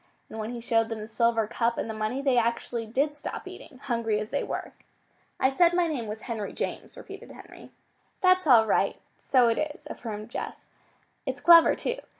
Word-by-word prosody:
And 220 - -7
when 215 0 -4
he 240 0 -5
showed 225 -1 +1
them 225 - -4
the 215 0 -7
silver 230 0 +1
cup 235 +2 -1
and - - -2
the 220 - -4
money 215 +5 -3
they 270 -3 +3
actually 235 0 -2
did 280 +6 0
stop 295 - -6
eating, 275 - -11
hungry 230 -5 0
as 215 0 -5
they 285 - -1
were. - - -5 0.7
"I 260 - +4
said 345 +5 +3
my 355 -1 +3
name 280 -9 -3
was 215 +1 -6
Henry 225 -5 -5
James," - - -5
repeated 400 +4 -10
Henry. - - -13 0.5
"That's 370 -2 +3
all 235 -5 +7
right. 215 - +1 0.2
So 255 -3 +3
it 230 - +1
is," 300 0 -4
affirmed 215 -1 -7
Jess. - - -6 0.6
"It's - - -3
clever, 335 -1 +7
too. - - -3
235 Hz, 195 wpm, -27 LUFS, 225-290 Hz, 0.7 s, all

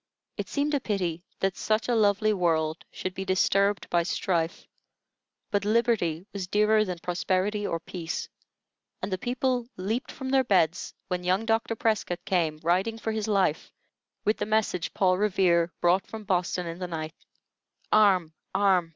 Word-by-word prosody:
It - - -5
seemed 290 +1 0
a 285 - +3
pity 180 -8 -2 0.2
that 195 -1 +1
such 215 +1 0
a 245 - +1
lovely 215 -1 +3
world 160 -4 0
should 185 - -5
be 190 - -4
disturbed 195 +1 +2
by 175 - +4
strife; 170 -1 -1 0.9
but 205 -1 +1
liberty 210 -7 +1
was 195 -3 -4
dearer 210 +2 +3
than 180 -4 -4
prosperity 185 +4 -1
or 165 - -2
peace, 165 -1 -5 0.8
and 195 - -2
the 185 - -2
people 250 +1 -1
leaped 215 +8 -2
from 265 -1 -6
their 265 0 +4
beds 180 -7 +1
when 180 -1 -2
young 185 +5 +1
Dr. 225 0 +1
Prescott 215 -6 -1
came, 160 -5 0
riding 185 +7 +1
for 225 0 -3
his 220 -1 -2
life, 190 -7 +1 0.5
with 215 - +2
the - - -2
message 210 -6 0
Paul 185 -1 +3
Revere 180 -5 +3
brought 180 +2 +3
from 220 -1 -7
Boston 180 -2 0
in 170 +1 -6
the 180 - -3
night: 160 -2 -5 0.8
"Arm! 190 -7 +4 0.2
arm! 190 -4 +3
190 Hz, 160 wpm, -27 LUFS, 175-215 Hz, 0.9 s, by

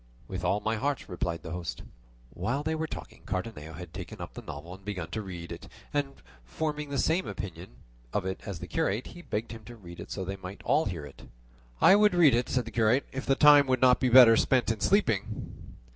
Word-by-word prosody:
"With 95 -1 -5
all 100 +4 +1
my 110 0 -1
heart," 140 +3 -2
replied 85 -2 -3
the 80 - -7
host. 85 -8 -5 0.5
While 135 +5 -2
they 160 +1 -1
were 160 0 -2
talking - - -9
Cardenio 90 -5 -4
had 85 0 -9
taken - - -8
up - - -7
the - - -8
novel 80 +5 -8
and 95 +1 -13
begun 90 -5 -5
to 110 - -3
read 85 -4 -8
it, 85 - -8 0.3
and 140 -1 -1 0.3
forming 150 - -3
the 140 - -2
same 170 +6 +1
opinion 90 -7 -7 0.4
of 100 - -1
it 95 0 -4
as 100 -4 -5
the - - -7
curate, 105 +6 -1
he 175 - -10
begged 115 -8 -4
him 115 -1 -9
to 120 - -10
read 85 -6 -12
it - - -8
so 95 - -4
that 95 +2 -4
they - - -24
might 95 +2 -8
all 155 - +2
hear 85 -7 -4
it. 70 - -14 0.5
"I - - +7
would 210 -2 +4
read 160 -7 +6
it," 120 +1 +1
said 125 -2 0
the 115 - -8
curate, 115 +4 +2
"if 135 +1 -5
the 135 - +4
time 145 -1 +7
would 130 -1 +2
not 125 0 +5
be 130 - +2
better 120 -2 +9
spent 120 -1 +2
in 110 - -3
sleeping." 110 - 0
110 Hz, 235 wpm, -29 LUFS, 90-135 Hz, 0.5 s, better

